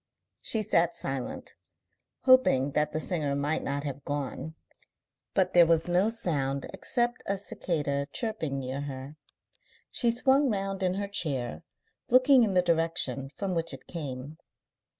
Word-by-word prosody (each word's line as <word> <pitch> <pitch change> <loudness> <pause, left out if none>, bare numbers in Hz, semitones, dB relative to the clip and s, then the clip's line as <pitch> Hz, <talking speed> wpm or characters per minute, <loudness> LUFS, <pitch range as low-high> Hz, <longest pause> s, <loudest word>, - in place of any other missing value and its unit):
She 220 -2 0
sat 170 -4 +2
silent, 135 -2 -4 0.7
hoping 255 - +5
that 150 +2 +1
the 155 - -2
singer 155 -5 -1
might 145 +3 0
not 140 0 -2
have 140 -1 -5
gone, 145 +2 -4 0.8
but 190 -2 +2
there 175 -1 +7
was 165 0 +3
no 180 +4 +3
sound 140 -12 -1
except 240 0 -1
a 200 - 0
cicada 145 -7 -2
chirping 215 - -3
near 135 +1 -3
her. 140 +1 -7 0.7
She 240 - +2
swung 265 +4 +3
round 195 -2 -2
in 185 -1 +1
her 200 +1 -2
chair, 135 - -2 0.5
looking 255 +1 +6
in 200 -4 +1
the 180 - +5
direction 165 -6 0
from 195 -2 -2
which 165 -1 -1
it - - -16
came. 145 -2 -6
165 Hz, 145 wpm, -29 LUFS, 140-200 Hz, 0.8 s, there